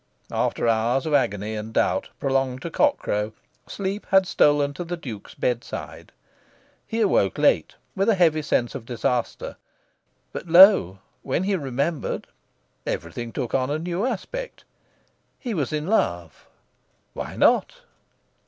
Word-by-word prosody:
After - - 0
hours 115 +4 +1
of 155 - -2
agony 105 -6 +1
and 110 +1 -5
doubt - - +1
prolonged 135 -1 0
to 170 - -5
cock 290 - +3
crow, 105 +1 -2 0.3
sleep 200 +1 -4
had 190 0 +5
stolen 145 -4 +3
to 175 - -5
the 175 +1 -4
Duke's 115 -10 -9
bed 120 -1 -1
side. - - -8 0.8
He 225 +1 -2
awoke 100 - +2
late, - - +2 0.2
with 195 +3 +1
a 220 - +4
heavy 160 -4 +3
sense 120 -4 0
of 115 - -8
disaster; 120 0 -2 0.8
but - - -6
lo! 175 - +7 0.2
when 140 +6 -1
he 200 +1 +1
remembered, 140 +1 -2 0.6
everything 115 +8 -4
took 120 - -4
on 130 0 +1
a 145 - 0
new 175 +4 -3
aspect. 375 - -4 0.7
He 245 -5 -4
was 150 -7 -1
in 150 0 -2
love. 85 - -1 0.7
"Why - - -6
not?" - - +2
145 Hz, 145 wpm, -24 LUFS, 120-185 Hz, 0.8 s, lo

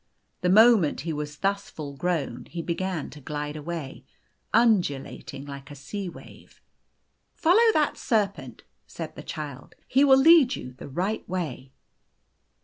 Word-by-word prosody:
The 180 - +1
moment 215 -5 +5
he 165 0 -3
was 150 0 -5
thus 200 +2 -1
full 145 -3 -7
grown, 140 -7 -2
he 170 -1 -6
began 175 -1 -3
to 150 - -12
glide 150 +1 -4
away, 155 -2 -6 0.5
undu 210 - +3
lating 135 +1 -9
like 140 -1 -9
a 145 - -9
sea 190 +7 -6
wave. - - -15 0.8
"Follow 445 +8 +5
that 300 -2 +1
serpent," 205 -4 -1 0.2
said - - -7
the - - -8
Child. - - -7
"He 270 - +4
will 270 -2 +7
lead 275 -2 +6
you 125 - -8
the 130 - -10
right 185 +10 -2
way." 150 -8 -4
175 Hz, 145 wpm, -26 LUFS, 145-215 Hz, 0.8 s, will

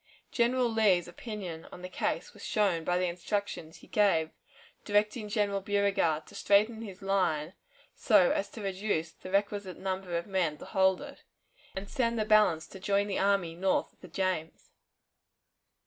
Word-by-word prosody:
General 245 +1 +2
Lee's 210 -6 +3
opinion 180 -3 -7
on 180 - -10
the - - -4
case 185 - -2
was - - -13
shown 195 -6 +1
by 180 +2 +1
the 180 - +1
instructions 180 -2 -3
he - - -17
gave 170 -7 +2 0.5
directing 210 +1 +1
General 205 -2 0
Beauregard 195 -6 +1
to - - -16
straighten 215 +3 +2
his 200 -3 -9
line 185 -5 0 0.4
so 210 -7 +4
as 200 - -1
to 220 - -9
reduce 190 -4 -1
the 185 - -11
requisite 200 -1 -1
number 185 -2 -3
of 170 - -3
men 180 -6 0
to - - -10
hold 190 -1 +2
it, - - -10 0.5
and 190 +1 -5
send 235 -3 0
the 215 - 0
balance 210 -7 +4
to 190 - -11
join 200 +1 +1
the 200 -2 -2
army 195 -4 +2
north 185 +3 0
of - - -36
the 185 - -10
James. 175 -2 -3
195 Hz, 165 wpm, -30 LUFS, 175-210 Hz, 0.5 s, so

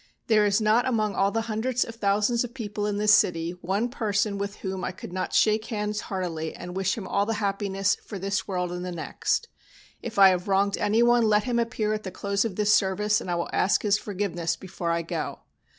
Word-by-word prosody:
There 215 -2 +4
is 205 +2 +2
not 220 +3 +3
among 215 -5 0
all 195 - +2
the 225 +2 -1
hundreds 230 +3 -1
of 230 - -8
thousands 210 +2 +1
of 245 0 -8
people 210 -3 -3
of 205 -1 -1
this 210 0 +4
city 165 -3 +3
one 195 +6 0
person 210 -4 -1
with 200 0 -3
whom 190 -1 -5
I - - -2
could 180 - -10
not 185 - -3
shake 215 0 +3
hands 210 -2 -2
heartily 170 -5 -3
and 180 0 -8
wish 190 +1 0
him 195 -4 -6
all 200 +1 0
the 225 - 0
happiness 195 -1 0
for 205 - -8
this 195 +1 -2
world 180 -2 -2
and 180 0 -4
the 180 - -4
next. 175 - -2 0.5
If 225 -2 -7
I 195 -1 +9
have 180 +1 -1
wronged 200 +1 +2
anyone 235 +2 +3
let 210 -1 +3
him 240 -2 0
appear 230 -2 -1
at 215 - -2
the 190 - -6
close 200 +2 -1
of 225 -5 -3
this 210 +1 +3
service, 210 +2 +2
and - - -7
I 175 - 0
will 170 - -2
ask 195 - +2
his 210 0 +2
forgiveness 180 -5 -2
before 175 0 -5
I 170 0 0
go. 165 - -4
205 Hz, 225 wpm, -26 LUFS, 190-215 Hz, 0.5 s, I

